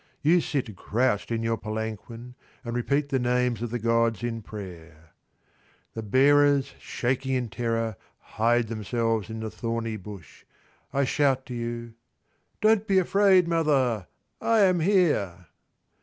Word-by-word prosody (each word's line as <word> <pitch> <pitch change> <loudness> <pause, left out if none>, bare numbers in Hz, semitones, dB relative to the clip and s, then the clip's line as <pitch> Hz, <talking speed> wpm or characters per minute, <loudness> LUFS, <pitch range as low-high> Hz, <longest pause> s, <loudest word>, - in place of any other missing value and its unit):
You 170 +4 +4
sit 125 -10 -3
crouched 105 0 0
in 115 -1 -1
your 115 0 0
palanquin 110 +3 -6 0.3
and 120 0 -4
repeat 140 +4 0
the 135 - +1
names 125 -2 0
of 120 - -2
the 120 - -2
gods 115 -1 +1
in 115 -1 -3
prayer. 85 -6 -11 0.8
The 110 - -5
bearers, 140 +4 +3
shaking 130 +2 -2
in 125 -3 -2
terror, 115 -2 -2 0.2
hide 115 +1 0
themselves 115 0 -1
in 110 0 -6
the 110 -1 -4
thorny 115 -1 -3
bush. 100 -3 -11 0.5
I 140 - +1
shout 135 -1 +1
to 125 - -7
you, 115 -1 -5 0.7
"Don't 215 -1 +3
be 195 - +3
afraid, 190 -1 +4
mother. 135 - +1 0.3
I 225 -2 +3
am 185 -3 +4
here." 155 - +1
120 Hz, 140 wpm, -26 LUFS, 110-140 Hz, 0.8 s, You